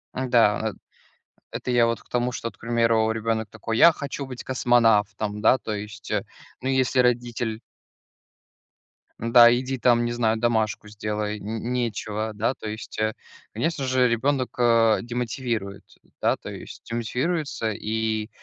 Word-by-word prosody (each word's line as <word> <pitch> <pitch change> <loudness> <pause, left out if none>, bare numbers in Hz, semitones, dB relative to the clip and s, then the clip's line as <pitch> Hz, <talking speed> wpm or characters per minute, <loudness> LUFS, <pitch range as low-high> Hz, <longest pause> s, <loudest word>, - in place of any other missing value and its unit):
М-да, 115 -4 +2
э, - - -14 0.8
это 125 - -4
я 120 -1 +4
вот 115 0 -2
к - - -29
тому, 125 0 0
что, 115 - -4
вот, - - -15
к - - -40
примеру, 115 -1 +2
ребенок 110 -1 -1
такой: 115 0 -4
"Я 170 0 +8
хочу 140 -1 -5
быть 125 -2 -8
космонавтом". 110 -5 +2
Да, 130 - +5
то 110 - -5
есть, 105 0 -8
э, - - 0 0.4
ну, 130 - -3
если 130 -1 +1
родитель 120 -2 0 1.6
Да, 120 +1 +7
иди 130 +1 -3
там, 120 -1 +3
не 120 - -1
знаю, 115 -2 +1
домашку 110 -2 0
сделай, 105 0 -3
нь 110 +2 -5
нечего. 110 -3 -2
Да, 110 +4 0
то 110 - -9
есть, 110 0 -7
э, 110 0 +1 0.4
конечно 140 +4 -1
же, 130 -1 +3
ребенок, 130 +2 0
а, 115 -2 +4
демотивирует, 120 -4 -3 0.4
да, - - +3
то - - -10
есть - - -9
демотивируется, 125 +2 -2
и, 110 +1 -2
115 Hz, 155 wpm, -24 LUFS, 110-125 Hz, 1.6 s, Я